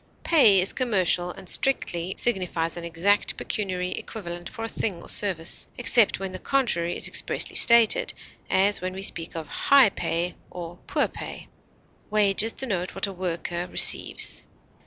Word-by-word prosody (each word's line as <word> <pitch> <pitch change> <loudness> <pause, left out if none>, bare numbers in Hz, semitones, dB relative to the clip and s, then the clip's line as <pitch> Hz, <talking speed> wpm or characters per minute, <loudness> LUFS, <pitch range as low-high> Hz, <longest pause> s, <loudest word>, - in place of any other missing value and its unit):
Pay 225 - +5
is 185 - 0
commercial 185 -8 +1
and 180 - -11
strictly 180 -9 0
signifies 180 -7 0
an 175 - -7
exact 170 +5 0
pecuniary 185 -3 -4
equivalent 175 -5 -7
for 225 - -8
a - - -3
thing 200 -5 -3
or - - -13
service, 185 -5 +1
except 235 -4 +3
when 195 -1 -5
the 185 - -7
contrary 175 -12 -1
is - - 0
expressly - - 0
stated, 235 -2 +5 0.4
as 200 +1 +2
when 185 0 -4
we 190 +1 -6
speak 165 -4 -2
of 160 -2 -6
"high 275 - +4
pay" 175 0 -3 0.2
or 175 0 -9
"poor - - 0
pay." - - -10 0.6
Wages 210 +1 +2
denotes 190 -9 -3
what 195 - -1
a 200 - -7
worker 175 -1 -4
receives. - - +2
185 Hz, 155 wpm, -24 LUFS, 175-210 Hz, 0.6 s, Pay